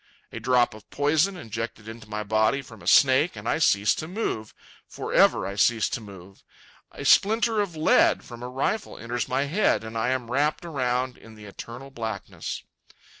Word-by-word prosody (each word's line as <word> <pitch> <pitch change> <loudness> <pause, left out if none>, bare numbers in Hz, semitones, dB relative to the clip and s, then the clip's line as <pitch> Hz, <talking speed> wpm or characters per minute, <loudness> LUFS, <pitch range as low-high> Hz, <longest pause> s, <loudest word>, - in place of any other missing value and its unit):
A - - -6
drop 125 -2 +2
of 110 -1 -15
poison 155 +7 +1
injected 115 -5 -6
into 115 -1 -10
my 105 0 -3
body 110 +6 +1
from 115 -5 -14
a - - -11
snake, 135 +5 +5
and - - -8
I - - +1
cease 105 -9 +3
to 155 - -5
move—for 170 - -6
ever - - +4
I 100 - -4
cease 115 +1 +3
to 120 - -4
move. 95 -2 -13 0.5
A - - -8
splinter 220 +2 +4
of 190 -5 -4
lead 155 0 +3
from 120 -1 -11
a 125 - -5
rifle 140 +12 -2
enters 120 +1 -3
my 130 +2 +1
head, 165 - +1
and 110 0 -8
I 115 +2 0
am 125 -2 -2
wrapped 150 +5 0
around 130 -5 -1
in 110 -1 -14
the 105 -1 -12
eternal 120 +6 -9
blackness. 110 -5 -5
125 Hz, 180 wpm, -25 LUFS, 110-145 Hz, 0.5 s, snake